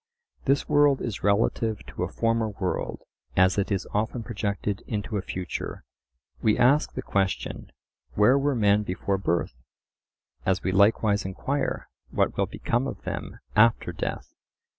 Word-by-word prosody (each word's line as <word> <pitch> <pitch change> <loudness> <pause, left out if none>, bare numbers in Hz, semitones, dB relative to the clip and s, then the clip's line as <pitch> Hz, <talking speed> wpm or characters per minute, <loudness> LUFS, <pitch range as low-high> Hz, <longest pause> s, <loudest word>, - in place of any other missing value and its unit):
This 140 +1 +2
world 145 -2 +4
is 115 -5 -4
relative 110 +1 +1
to - - -8
a - - -1
former 115 -1 +1
world, 95 -3 -3 0.3
as 95 +2 +4
it 100 - -1
is 95 -2 -1
often 110 +3 -1
projected 105 -2 -2
into 105 0 -3
a 100 - 0
future. 95 -1 -5 0.6
We 110 - +3
ask 140 +5 +4
the - - -4
question, 95 -1 -1 0.4
Where 105 +6 +5
were 140 0 +1
men 105 -2 +4
before 95 0 -2
birth? 85 -8 0 0.9
As 95 0 +1
we 95 - 0
likewise 100 +1 +3
enquire, 130 +9 -2 0.2
What - - +1
will - - +1
become 120 +3 -1
of - - -7
them - - -5
after 110 +2 +4
death? - - -5
105 Hz, 145 wpm, -26 LUFS, 100-115 Hz, 0.9 s, Where